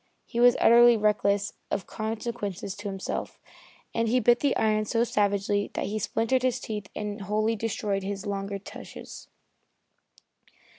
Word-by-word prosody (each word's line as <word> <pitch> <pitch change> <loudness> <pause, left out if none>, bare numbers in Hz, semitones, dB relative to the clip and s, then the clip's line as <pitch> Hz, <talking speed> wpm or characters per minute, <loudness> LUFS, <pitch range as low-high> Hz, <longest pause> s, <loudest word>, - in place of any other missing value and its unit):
He 235 - -4
was 245 0 +7
utterly 240 0 +7
reckless 205 -1 +1 0.2
of 190 - -2
consequences 215 -3 -4
to 205 0 -7
himself, 195 -1 -4 0.5
and 230 0 +1
he 250 +3 +3
bit 240 +1 +4
the 285 -2 +1
iron 215 -1 +2
so 230 +2 +1
savagely 205 -2 +1
that - - -1
he 215 +1 -2
splintered 230 +4 0
his 255 -1 +1
teeth 210 -3 -5
and 210 0 -4
wholly 215 +3 0
destroyed 205 -2 -2
his 195 +1 -4
longer 200 0 -3
tushes. 195 - -10
210 Hz, 145 wpm, -27 LUFS, 200-230 Hz, 0.5 s, was